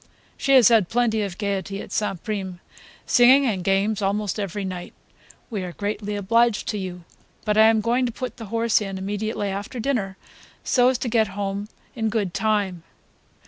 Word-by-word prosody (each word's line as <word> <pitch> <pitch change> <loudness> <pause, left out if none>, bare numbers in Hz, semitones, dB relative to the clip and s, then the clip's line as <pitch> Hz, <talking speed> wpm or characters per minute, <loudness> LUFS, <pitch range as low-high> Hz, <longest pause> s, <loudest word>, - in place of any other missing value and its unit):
"She 275 - +1
has 255 -4 +8
had 220 -6 +4
plenty 225 -2 +1
of 195 -3 -4
gaiety 200 -1 -3
at - - -9
St. 195 -5 -2
Prime; 190 -4 -4 0.5
singing 260 +3 +6
and 200 -7 -1
games 195 +3 +1
almost 205 +1 -1
every 200 0 -3
night. 180 -2 -6 0.6
We 210 -4 -2
are 180 -1 -5
greatly 205 +1 -3
obliged 230 +3 +2
to 210 - -2
you, 180 -2 -6 0.4
but 210 -1 +1
I 220 +1 +7
am 225 -1 +3
going 245 +3 +1
to - - -3
put 255 +1 -6
the 230 - -7
horse 230 +1 +2
in 195 -2 -4
immediately 205 +2 -3
after 200 +6 -5
dinner 220 -7 -1 0.5
so 250 -1 +3
as 260 - +1
to 250 - -4
get 225 -2 +2
home 200 +1 -3 0.3
in 220 -2 -1
good 205 -5 -1
time." 205 -5 0
210 Hz, 185 wpm, -23 LUFS, 195-230 Hz, 0.6 s, has